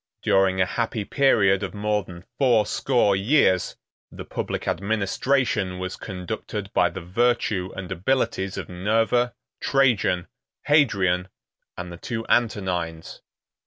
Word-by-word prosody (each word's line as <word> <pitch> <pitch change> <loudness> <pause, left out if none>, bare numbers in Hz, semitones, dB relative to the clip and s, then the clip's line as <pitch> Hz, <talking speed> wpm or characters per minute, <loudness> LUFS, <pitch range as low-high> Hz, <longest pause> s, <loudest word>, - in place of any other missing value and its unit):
During 95 -1 +3
a 90 - +4
happy 110 +1 -2
period 100 -9 +3
of 100 +1 -5
more 105 0 0
than 90 0 -12
fourscore 120 -3 +3
years, 95 - +2 0.4
the - - -9
public - - -4
administration 105 - 0
was 90 0 -4
conducted 100 +1 -6
by - - +3
the 95 - -7
virtue 100 -1 0
and 95 -2 -7
abilities 95 -1 -1
of - - -5
Nerva, 115 +6 +1 0.2
Trajan, 120 -10 +2 0.4
Hadrian, 95 - +2 0.5
and 90 0 -6
the 85 - -8
two 115 +5 -5
Antonines. 90 -8 -1
100 Hz, 120 wpm, -24 LUFS, 90-120 Hz, 0.5 s, a